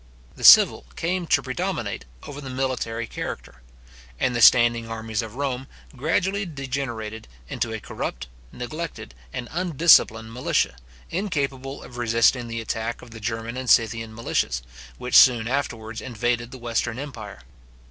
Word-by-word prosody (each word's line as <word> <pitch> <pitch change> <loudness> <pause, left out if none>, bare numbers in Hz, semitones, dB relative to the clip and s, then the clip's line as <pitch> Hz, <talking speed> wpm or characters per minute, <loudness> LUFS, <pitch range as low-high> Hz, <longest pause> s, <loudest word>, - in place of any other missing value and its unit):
The - - -11
civil - - +8
came 175 +1 -2
to 140 - +3
predominate 130 -1 -3 0.2
over 145 0 -8
the 135 - -7
military 130 -3 -2
character; 60 - -7 0.6
and 125 - +1
the 120 - 0
standing 120 -1 +6
armies 110 -1 -3
of 115 0 -8
Rome 135 -1 -3 0.3
gradually 180 +8 0
degenerated 130 - -5 0.2
into 115 - -3
a 110 - -4
corrupt, - - -5 0.3
neglected, 155 - -6 0.2
and 120 - -5
undisciplined 155 -10 +4
militia, 120 - 0 0.4
incapable 140 -8 -3
of 120 - -11
resisting 120 +1 +2
the 115 0 -4
attack 115 +1 -4
of 120 - -13
the 110 - -9
German 115 +2 -4
and 130 -1 -4
Scythian 115 -1 +2
militias, 65 - -1 0.3
which 125 - -6
soon 120 -3 +7
afterwards 115 -4 -3
invaded 120 -1 -2
the 130 - -10
western 120 -1 -2
empire. 115 - -8
120 Hz, 140 wpm, -24 LUFS, 115-135 Hz, 0.6 s, civil